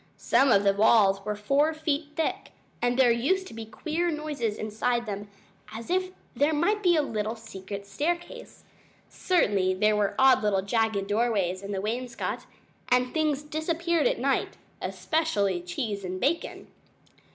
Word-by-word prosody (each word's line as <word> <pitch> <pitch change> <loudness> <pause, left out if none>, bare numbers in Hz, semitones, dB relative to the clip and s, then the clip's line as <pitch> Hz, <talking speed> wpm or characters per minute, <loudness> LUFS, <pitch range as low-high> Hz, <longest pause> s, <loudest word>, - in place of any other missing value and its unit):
Some 270 -1 +3
of 200 -2 +5
the 200 -1 +4
walls 200 -2 +4
were 210 +1 -2
four 280 +9 +1
feet 300 -1 -2
thick, 325 - -2 0.3
and 245 0 +1
there 255 -3 +5
used 295 +12 +1
to - - -11
be 225 -1 -7
queer 325 +9 -2
noises 300 -8 -2
inside 230 +3 -1
them, 205 -1 -5 0.5
as 230 +7 -7
if 370 0 +1 0.3
there 295 +2 +2
might 410 +8 +1
be 355 -3 +4
a 305 - +3
little 220 -4 -3
secret 200 -3 -8
staircase. 345 - -4 0.5
Certainly 200 - +1
there 210 +2 +3
were 205 -1 0
odd 265 -1 +5
little 200 -3 +1
jagged 220 -1 0
doorways 205 -4 0
in 200 +1 -6
the 195 -1 -2
wainscot, 235 +3 -4 0.4
and 250 0 +2
things 305 -3 0
disappeared 330 +5 0
at - - 0
night - - -1 0.2
especially 205 - 0
cheese 200 +3 -4
and 185 0 -4
bacon. 295 - -1
235 Hz, 155 wpm, -27 LUFS, 205-310 Hz, 0.5 s, of